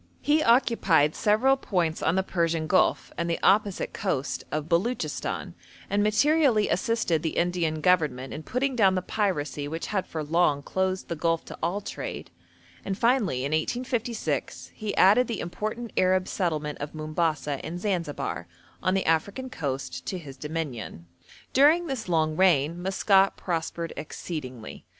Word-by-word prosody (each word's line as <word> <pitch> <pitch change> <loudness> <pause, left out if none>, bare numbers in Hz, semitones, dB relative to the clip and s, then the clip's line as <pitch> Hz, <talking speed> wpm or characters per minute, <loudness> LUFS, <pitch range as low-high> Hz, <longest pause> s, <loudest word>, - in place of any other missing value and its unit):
He 300 +1 +3
occupied 210 - +3
several 225 +6 +3
points 175 -10 -1
on 160 - +2
the 190 - +2
Persian 165 -3 0
Gulf 185 +4 +2
and 170 0 -1
the 170 - 0
opposite 200 -1 +2
coast 145 -9 -2
of 155 0 -2
Beluchistan, 185 +9 -1 0.4
and 205 +1 +2
materially 240 +1 +3
assisted 230 - +1
the 160 - -3
Indian 170 -3 0
Government 150 -8 +1
in 155 - -6
putting 255 - -1
down 195 -5 +4
the 185 - -1
piracy 150 -10 -1
which 165 +3 -4
had 190 -2 0
for 160 -1 -4
long 150 -2 +2
closed 190 +2 -1
the 170 - -3
Gulf 165 +1 0
to - - -9
all 175 +5 -1
trade; - - -6 0.5
and 195 -1 -3
finally, 220 - +2
in 140 - -2
1856, 235 - -2
he 215 -2 -5
added 215 +6 +6
the 230 -4 -3
important 215 +6 -4
Arab 185 0 +2
settlement 155 -5 -2
of 145 +2 -6
Mombasa 155 -2 -1
and 175 +2 -5
Zanzibar, 170 - -2 0.3
on 185 - +1
the 195 - 0
African 200 +11 0
coast, 140 - -4
to 185 - -2
his 145 -6 -9
dominion. 140 - -5 0.5
During 305 +6 +5
this 260 - -4
long 155 -2 +1
reign 170 -2 +3
Maskat 195 +1 +3
prospered 165 -1 -3
exceedingly. 130 -8 -7
175 Hz, 150 wpm, -26 LUFS, 155-210 Hz, 0.5 s, added